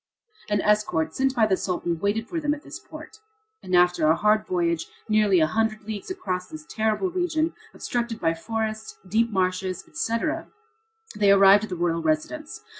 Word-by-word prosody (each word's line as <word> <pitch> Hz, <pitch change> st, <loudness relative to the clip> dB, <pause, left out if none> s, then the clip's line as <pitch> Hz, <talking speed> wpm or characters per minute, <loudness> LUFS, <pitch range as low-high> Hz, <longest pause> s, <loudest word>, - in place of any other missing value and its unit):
An 205 Hz, -1 st, +1 dB
escort 210 Hz, -7 st, +1 dB
sent 265 Hz, 0 st, 0 dB
by 225 Hz, -3 st, +4 dB
the 200 Hz, -3 st, +2 dB
Sultan 175 Hz, -3 st, -2 dB
waited 210 Hz, +5 st, -1 dB
for 340 Hz, -, -3 dB
them 295 Hz, 0 st, +1 dB
at 295 Hz, -, -14 dB
this -, -, -9 dB
port, 435 Hz, -, -12 dB, 0.4 s
and 185 Hz, -, -1 dB
after 180 Hz, -3 st, +4 dB
a 160 Hz, -, +5 dB
hard 215 Hz, +3 st, +2 dB
voyage 170 Hz, -2 st, 0 dB, 0.2 s
nearly 210 Hz, -4 st, +3 dB
a 160 Hz, -, +5 dB
hundred 220 Hz, +5 st, -1 dB
leagues 215 Hz, -, -6 dB
across 185 Hz, -, -3 dB
this 315 Hz, 0 st, -10 dB
terrible 220 Hz, -, 0 dB
region, 335 Hz, -3 st, 0 dB, 0.2 s
obstructed 235 Hz, -2 st, -3 dB
by 165 Hz, -1 st, +1 dB
forests, 220 Hz, +5 st, -4 dB
deep 230 Hz, +4 st, +2 dB
marshes, 185 Hz, -1 st, -1 dB
etc., 230 Hz, -, -2 dB, 0.7 s
they 205 Hz, -1 st, +3 dB
arrived 200 Hz, +1 st, +6 dB
at -, -, -14 dB
the 180 Hz, -, -3 dB
royal 170 Hz, -1 st, 0 dB
residence. 160 Hz, -, -2 dB
210 Hz, 175 wpm, -25 LUFS, 180-230 Hz, 0.7 s, arrived